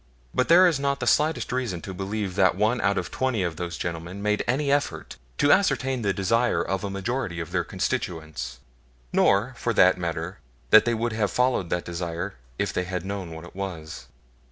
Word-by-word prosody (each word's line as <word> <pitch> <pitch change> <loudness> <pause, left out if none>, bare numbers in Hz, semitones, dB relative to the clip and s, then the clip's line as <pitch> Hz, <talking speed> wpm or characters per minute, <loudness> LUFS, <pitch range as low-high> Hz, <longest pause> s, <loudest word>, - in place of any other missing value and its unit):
But 130 - +1
there 175 +3 +7
is 160 -6 +1
not 140 0 0
the 120 - -2
slightest 150 +7 +2
reason 125 -8 -2
to 95 - -6
believe 100 +1 -3
that 95 -1 +3
one 110 +4 +1
out 100 0 +2
of - - -3
twenty 130 -6 0
of 85 -3 -3
those 85 -1 -4
gentlemen 85 +3 -5
made 105 +1 0
any 140 +3 +1
effort 145 0 -1 0.2
to 145 - +4
ascertain 135 -10 +2
the 100 -3 +1
desire 115 +6 +1
of 95 +1 -2
a 100 - -2
majority 100 -1 -3
of 80 0 -5
their 90 -1 +1
constituents; 80 -9 -3 0.6
nor, 105 +7 +3
for 115 -2 -1
that 90 -1 +5
matter, 85 +2 -4 0.3
that 110 0 +8
they 120 -1 +1
would 115 +1 -1
have 110 -2 0
followed 125 -8 +1
that 90 - -1
desire 85 +2 -4 0.2
if - - -1
they 90 - -1
had 90 -1 -4
known 100 -3 -4
what 80 +1 -8
it 85 - -14
was. 80 -10 -6
100 Hz, 200 wpm, -25 LUFS, 85-120 Hz, 0.6 s, that